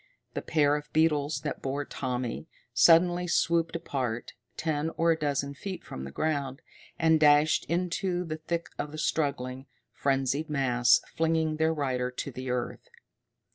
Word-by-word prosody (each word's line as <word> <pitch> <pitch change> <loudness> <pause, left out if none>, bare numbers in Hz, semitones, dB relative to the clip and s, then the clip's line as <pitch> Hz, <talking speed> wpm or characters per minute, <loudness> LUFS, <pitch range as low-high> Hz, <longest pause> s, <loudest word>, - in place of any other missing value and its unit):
The - - -3
pair 145 -2 +2
of 150 0 -6
beetles 155 -2 +2
that 150 - -4
bore 140 +2 -2
Tommy, 125 +2 -4 0.3
suddenly 175 +7 +5
swooped 170 -1 +1
apart, 125 -8 -3 0.2
ten 155 -1 -1
or 165 0 +3
a - - +3
dozen 140 -2 -1
feet 185 +6 -6
from 65 - -7
the 70 - -7
ground, 140 - -2 0.3
and 160 -1 +4
dashed 150 0 +5
into 180 +1 -1
the 155 -2 -4
thick 165 +2 -3
of 145 - -3
the 155 - -7
struggling, 135 -4 -1 0.3
frenzied 135 +3 0
mass, 125 -4 +3
flinging 160 -1 +1
their 160 +1 +2
rider 130 -5 -1
to 130 0 -6
earth. 125 -1 -3
150 Hz, 145 wpm, -28 LUFS, 135-160 Hz, 0.3 s, suddenly